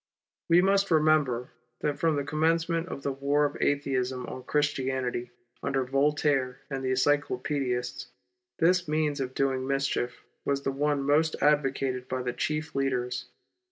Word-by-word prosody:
We 170 +2 +6
must 195 +1 +3
remember 150 -6 +2 0.3
that 145 -1 -1
from 165 -2 +2
the 140 - -1
commencement 165 +3 +1
of 140 - -6
the 140 - 0
war 140 +2 +1
of 145 - -2
Atheism 130 -3 0
on 130 - -7
Christianity, 130 -3 -1 0.3
under 135 -1 0
Voltaire 135 -1 +1
and 135 -1 -3
the 130 - 0
Encyclo 140 0 +2
paedists, 125 -4 -2 0.5
this 180 +1 +3
means 150 -1 0
of 130 0 -4
doing 130 -1 0
mischief 135 -3 -1 0.2
was 140 0 -1
the 135 - 0
one 145 +1 0
most 155 +3 +2
advocated 135 -3 +1
by 130 0 -2
the 125 -1 -2
chief 155 +4 -2
leaders. 130 -2 -1
140 Hz, 150 wpm, -28 LUFS, 130-150 Hz, 0.5 s, We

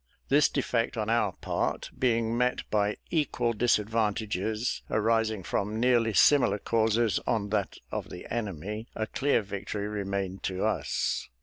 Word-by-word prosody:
This 145 +2 +5
defect 120 -4 -1
on 110 0 -1
our 115 0 +2
part - - -2
being 115 -2 +1
met 125 +1 0
by 105 -1 +1
equal 125 -7 +1
disadvantages, 110 -1 0
arising 110 -2 +1
from 105 +5 -2
nearly 120 -3 +3
similar 135 +1 +5
causes, 110 -1 +1
on 105 -3 0
that 100 -3 -1
of - - -4
the 90 - -8
enemy, 105 0 -4
a 110 - -1
clear 135 0 +1
victory 100 +1 -4
remained 100 -2 -3
to 95 -1 -2
us. - - -1
110 Hz, 135 wpm, -28 LUFS, 105-115 Hz, -, This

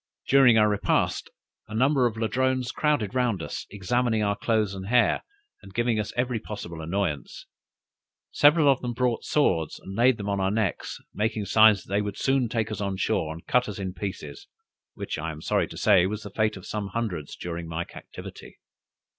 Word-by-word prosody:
During 130 -4 +6
our 105 -1 +5
repast, 105 -1 0 0.4
a 110 - -7
number 130 +2 +3
of 115 -2 -5
Ladrones 130 +2 0
crowded 145 -9 0
round 120 -9 0
us, - - -6
examining 110 +3 0
our 100 0 +1
clothes 110 -2 0
and 95 0 -7
hair, 120 +2 +3 0.4
and 95 - -14
giving 120 -2 +1
us 105 - -3
every 125 -1 0
possible 85 -7 -7
annoyance. 85 -3 -3 0.9
Several 150 +1 +5
of 135 -2 +4
them 120 -1 -3
brought 125 -2 0
swords, 85 - +1
and 95 - -9
laid 120 +2 +4
them 100 - -5
on 100 -1 0
our 95 0 +1
necks, 105 -2 -2 0.2
making 110 0 -1
signs 110 -3 +5
that 95 - -8
they 100 - +3
would 105 -1 -4
soon 135 -3 +1
take 110 -2 -1
us 105 -1 -4
on 100 -1 -2
shore, 80 -3 0
and 80 +1 -9
cut 125 -2 +2
us 105 - -6
in 95 -2 -4
pieces, 90 -6 -6 0.5
which - - -5
I 80 +2 -3
am 75 -1 -7
sorry - - 0
to - - -10
say 95 -4 +4
was 105 +2 -4
the 100 - -8
fate 110 0 0
of 95 - -11
some 105 -2 -4
hundreds 95 -9 -4
during 85 -1 -6
my 80 +1 -3
captivity. - - -11
105 Hz, 195 wpm, -26 LUFS, 95-120 Hz, 0.9 s, During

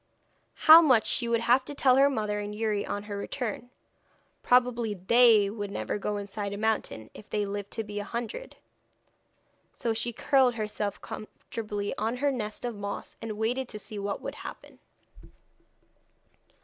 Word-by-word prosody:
'How 320 +1 +9
much 255 -9 +4
she 240 - +1
would 230 0 +1
have 245 +3 +4
to 290 - -7
tell 260 -2 +4
her 275 +1 +6
mother 210 -5 -1
and 205 0 -5
Youri 210 -2 -1
on 205 - -3
her 205 -1 -6
return. 235 +3 -4 0.7
Probably 245 -3 +2
they 215 +2 +5
would 205 0 -5
never 200 - -3
go 210 +1 -2
inside 200 0 -5
a - - -5
mountain, 210 - -2
if 215 - -13
they 210 -1 0
lived 200 0 -5
to 225 - -2
be 205 -1 -5
a - - -3
hundred.' 235 - -5 1.2
So 230 - -1
she 235 +2 -1
curled 255 +1 +3
herself 210 -2 -3
comfortably 210 -1 -6
on 225 +3 -1
her 285 +2 +1
nest 215 -3 -4
of 240 - -2
moss, 200 -1 -6
and 220 -2 -5
waited 245 +4 -1
to 215 - -6
see 210 0 -7
what 200 0 -3
would - - -4
happen. - - -10
220 Hz, 165 wpm, -28 LUFS, 205-240 Hz, 1.2 s, How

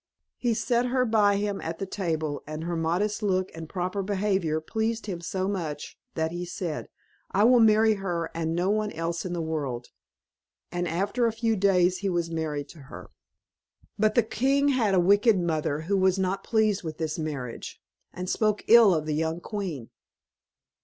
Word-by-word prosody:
He 240 -2 +1
set 240 +2 +1
her 255 0 +1
by 210 -3 +3
him 205 0 -2
at 165 0 -4
the 195 - -3
table, 160 -6 -2
and 155 +1 -5
her 170 +1 -2
modest 180 +7 0
look 185 -3 0
and 160 -1 -8
proper 185 +2 -2
behaviour 190 -5 0
pleased 220 +7 -2
him 180 -5 -5
so 185 +2 -2
much, 165 -7 -4 0.2
that 160 0 -1
he 175 +1 -4
said, 175 -2 -5 0.4
"I 200 - +2
will 245 +2 +6
marry 220 0 +5
her, 175 -5 -3
and 165 0 -2
no 180 +3 +1
one 215 0 0
else 165 +2 -3
in 180 - -3
the 170 -2 -2
world," 140 -7 -3 0.8
and 175 0 -2
after 200 +8 0
a - - +1
few 225 0 0
days 185 -2 +3
he 200 - -1
was 170 -2 -1
married 155 -3 -3
to 165 - -13
her. - - -10 0.9
But 215 0 +3
the 240 - +5
king 275 +6 +1
had 230 -8 +2
a - - +5
wicked 200 +3 +4
mother, 155 -3 -1
who 190 +5 -1
was 190 0 +3
not 190 +1 -1
pleased 215 -3 +1
with 155 -3 -6
this 160 -1 -3
marriage, 140 -6 -5 0.3
and 180 +1 -6
spoke 215 +2 +1
ill 225 -5 +7
of 155 -1 -1
the 155 - -1
young 160 +2 -1
queen. 175 - -5
185 Hz, 185 wpm, -27 LUFS, 165-210 Hz, 0.9 s, ill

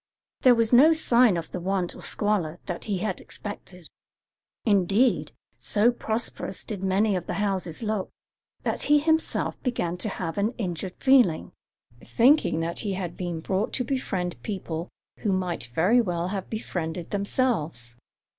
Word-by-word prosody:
There 250 -2 +7
was 230 0 +1
no 295 +7 +8
sign 245 - +4
of 165 - -5
the 180 - -4
want 185 0 -1
or - - -11
squalor 195 -6 0
that 175 -2 -5
he 205 -3 -1
had 190 0 -3
expected; 180 -4 -9 0.8
indeed, 205 +4 +3 0.3
so 220 +3 +3
prosperous 225 -4 -3
did 205 -4 -5
many 195 +2 +2
of 175 -2 -4
the - - -2
houses 195 -2 -2
look, 215 -3 -1 0.5
that - - -1
he 295 - +7
himself 320 +2 0
began 180 -9 -1
to 215 - -2
have 180 -1 -4
an 215 +5 0
injured 180 -4 -4
feeling, 255 -12 +4 0.5
thinking 250 - +3
that 170 +1 -3
he 205 -2 -2
had 180 -3 -4
been 175 -3 -4
brought 190 +5 -1
to 250 - +1
befriend 195 -9 -3
people 175 -5 -4 0.3
who 205 - 0
might 180 -8 -1
very 210 +10 +4
well 175 -4 -2
have 195 -1 -4
befriended 175 -6 -4
themselves. 195 - -1
195 Hz, 155 wpm, -26 LUFS, 175-230 Hz, 0.8 s, no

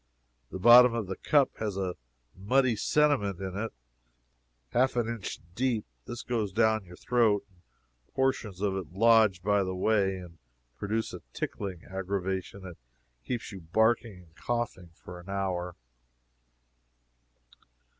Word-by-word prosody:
The - - -6
bottom 120 +4 +8
of 115 -3 -2
the 95 0 -5
cup 145 +5 +3
has 105 -3 -3
a 95 -2 -2 0.4
muddy 125 +6 +2
sediment 130 - +1
in 95 -1 -5
it 110 +3 -3 1.0
half 130 - +2
an 120 -2 +1
inch 115 -5 -5
deep. 120 0 0 0.2
This 120 - -6
goes 110 -5 -1
down 110 0 +2
your 90 0 -12
throat, 110 -2 +2
and 90 - -28 0.6
portions 120 -8 -1
of 100 -2 0
it 95 -4 -5
lodge 110 -3 +4
by 100 0 +3
the 95 0 -3
way, 95 0 +2
and 85 -3 -11 0.4
produce 110 +2 -2
a - - -7
tickling 95 -5 -5
aggravation 95 0 -4
that 90 -3 -9 0.5
keeps 120 -3 -4
you 95 - -8
barking 110 +2 +1
and 80 -1 -24
coughing 120 -7 -3
for 90 +2 -11
an 90 +2 -13
hour. 90 -3 -2
100 Hz, 140 wpm, -29 LUFS, 95-115 Hz, 1.0 s, bottom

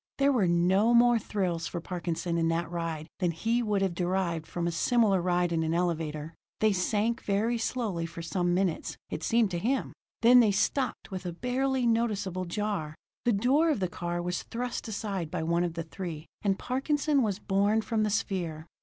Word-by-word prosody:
There 280 +1 +4
were 225 -9 +2
no 185 +7 +3
more 240 0 +6
thrills 180 -6 -2
for 175 - -4
Parkinson 170 0 -3
in 165 - +2
that 165 0 -1
ride 165 -3 -3
than 180 -3 +2
he 225 +9 0
would 210 -4 +1
have 190 -3 0
derived 175 -2 -1
from 175 0 -3
a 170 - 0
similar 200 +2 +3
ride 175 0 +1
in 165 -1 +1
an 160 +1 0
elevator. 160 -3 -2 0.3
They 215 -1 +3
sank 210 +5 0
very 220 +4 0
slowly 215 -8 -2
for 170 +1 -8
some 175 +1 0
minutes, 185 -3 -1
it - - -3
seemed 225 +2 +2
to 175 - -1
him; 255 +8 -1 0.3
then 245 +2 +8
they 225 -3 +5
stopped 235 +4 0
with 185 -1 -5
a - - -2
barely 255 +6 0
noticeable 210 -6 0
jar. 175 -4 -3 0.3
The 240 - +4
door 265 +11 +3
of 295 - +1
the 185 - 0
car 175 0 -3
was 180 0 -2
thrust 245 +1 -4
aside 200 -6 -3
by 160 - -3
one 170 +2 +1
of 170 -2 -2
the 165 - -3
three, 165 -2 -6 0.2
and 195 -2 +1
Parkinson 285 +2 +1
was 205 -5 0
borne 205 +2 +2
from 220 +1 0
the 215 - +2
sphere. 180 -7 -2
190 Hz, 195 wpm, -29 LUFS, 170-230 Hz, 0.3 s, then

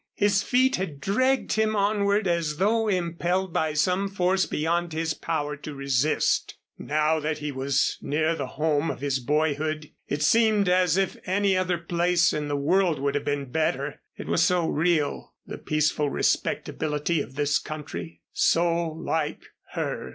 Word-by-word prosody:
His 205 -1 +2
feet 260 +3 +2
had 170 -7 -4
dragged 255 - +1
him 220 0 +1
onward 200 0 +1
as 165 -3 0
though 220 +4 +2
impelled 180 -1 -1
by 155 -1 0
some 180 +6 +1
force 190 -1 +1
beyond 170 +2 -1
his 160 0 -1
power 150 -3 -3
to 150 0 -8
resist. 140 +2 +1 0.2
Now 155 +1 +1
that 155 0 -2
he 150 -1 -4
was 135 0 0
near 155 +3 0
the - - -4
home 155 0 +1
of - - -5
his 140 -2 0
boyhood 150 +2 -1 0.2
it 145 +1 -2
seemed 215 +1 +3
as 180 -1 +3
if 195 -1 0
any 195 +1 +2
other 185 -1 0
place 175 +1 +1
in 150 -1 -2
the 145 0 -1
world 170 +3 +2
would 140 +1 -1
have 145 0 -2
been 140 -3 -2
better. 155 -2 -1 0.2
It - - -7
was - - +2
so 175 -1 +2
real 160 -1 0
the - - -8
peaceful 155 -1 0
respectability 150 +3 -1
of 135 - -8
this 145 0 +1
country 85 - -7
so 170 0 +2
like 160 -1 -3 0.3
Her. 65 - -3
160 Hz, 160 wpm, -25 LUFS, 150-185 Hz, 0.3 s, seemed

